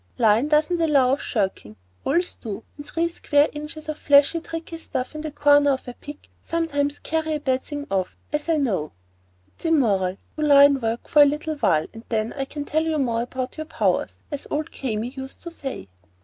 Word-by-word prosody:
Line 225 +3 +4
doesn't 310 +3 +2
allow 280 -6 +4
of 275 - -1
shirking. 190 - -2 0.3
Oils 350 +1 +1
do, 220 0 -7
and 290 - -8
three 330 +3 -1
square 295 -3 +2
inches 300 +1 -8
of 310 -1 -4
flashy, 285 +3 +5
tricky 330 0 -7
stuff 260 -4 -4
in 305 - -5
the 310 - -4
corner 290 -1 +4
of 265 - -5
a 245 - -5
pic 290 +3 -11
sometimes 290 -4 -1
carry 315 0 -1
a - - -2
bad 260 -2 0
thing 290 -1 -6
off,—as 275 - -3
I 325 - +3
know. 195 - -1 0.6
That's - - -17
immoral. 200 - +2 0.2
Do - - -3
line 280 -2 +6
work 225 +1 -2
for 300 - +6
a - - +9
little 300 +3 -1
while, 155 - +2
and 225 0 -10
then 220 0 -1
I 270 -1 -3
can 290 +1 -6
tell 315 +1 0
more 235 -5 0
about 255 +3 -4
your 310 0 -5
powers, - - -1
as 285 -1 -4
old 300 0 -2
Kami 230 -3 -3
used 265 +1 -8
to 340 - -6
say." 270 - -6
285 Hz, 195 wpm, -24 LUFS, 245-310 Hz, 0.6 s, a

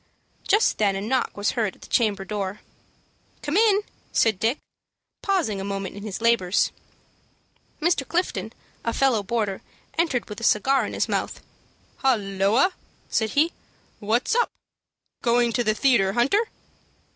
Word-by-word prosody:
Just 420 +3 +3
then 200 -2 +2
a 195 - -3
knock 245 +3 -1
was 205 +1 +1
heard 220 -6 -1
at - - -17
the - - -11
chamber 210 -4 +1
door. 200 0 -4 0.8
"Come 295 +2 -2
in!" 420 -1 +4 0.3
said 220 -5 +2
Dick, 230 +7 +1 0.6
pausing 330 - 0
a - - -4
moment 195 -1 -4
in 205 - -8
his 210 0 -5
labors. 225 -5 +3 1.1
Mr. 315 -5 +1
Clifton, 355 +2 -1 0.3
a 230 - -1
fellow 260 -5 +2
boarder, 205 -2 -2 0.4
entered 295 -8 +1
with 210 +1 -8
a - - -7
cigar 265 +5 +3
in - - -7
his - - 0
mouth. - - -2 0.6
"Holloa," 215 - +2 0.4
said 220 -1 +1
he, 320 +4 +4 0.5
"what's 225 - +1
up? 480 +1 +2 0.7
Going 240 -1 +2
to 240 - +1
the 215 -1 +1
theatre, 220 -7 +3
Hunter?" 340 - +2
230 Hz, 145 wpm, -24 LUFS, 205-275 Hz, 1.1 s, in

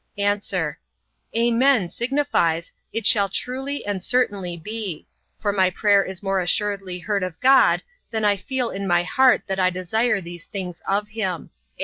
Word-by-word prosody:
A. 205 0 +2 1.0
"Amen" 235 -2 +3
signifies, 235 - 0 0.2
it 225 -2 -3
shall 200 -4 +5
truly 265 +7 -3
and 200 -2 -2
certainly 200 -6 0
be: 205 -1 -5 0.3
for 205 -1 -1
my 190 -2 +3
prayer 200 +1 +3
is 190 0 -7
more 195 -1 +1
assuredly 195 0 -1
heard 200 +3 -2
of 180 -3 -4
God, 265 +1 +5 0.3
than 220 -2 -1
I 205 -1 +4
feel 250 +4 -2
in 195 0 -4
my 175 -1 +3
heart 260 +8 +4
that 195 -2 -3
I 185 -1 +4
desire 205 +5 0
these 175 -1 -9
things 180 -4 -6
of 205 +2 0
him. 195 -6 -3
200 Hz, 155 wpm, -23 LUFS, 185-230 Hz, 1.0 s, shall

